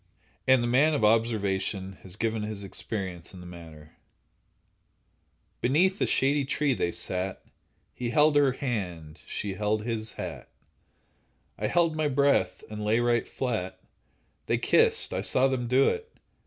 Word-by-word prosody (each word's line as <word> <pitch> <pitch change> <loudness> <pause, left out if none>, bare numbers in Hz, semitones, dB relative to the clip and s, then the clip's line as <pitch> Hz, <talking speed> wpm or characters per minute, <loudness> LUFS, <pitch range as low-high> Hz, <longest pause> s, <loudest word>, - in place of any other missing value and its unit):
And 130 -2 +5
the - - 0
man 145 +6 +4
of 140 - -1
observation 100 -4 0
has 95 -1 -9
given 110 0 -1
his 105 -1 -5
experience 95 -3 -5
in - - -10
the 90 - -10
matter: 80 -3 -12 1.6
Beneath 180 - +2
a - - +3
shady 140 +2 +2
tree 140 +1 0
they 85 -7 -1
sat; 90 +2 -3 0.5
He 120 -1 -3
held 150 +5 +4
her 140 -3 +4
hand, 90 - -4
she 100 -2 -3
held 105 +2 -1
his 110 -1 -3
hat, - - -7 1.1
I - - -2
held 170 -2 +2
my 155 -1 +1
breath 140 0 +2
and 105 0 -6
lay 110 +2 +2
right 120 -1 +1
flat— 95 -8 -3 0.7
They - - +2
kissed—I - - +2
saw 130 +1 +3
them 130 -2 -1
do 130 +3 +4
it. 455 0 -4
115 Hz, 145 wpm, -28 LUFS, 95-135 Hz, 1.6 s, And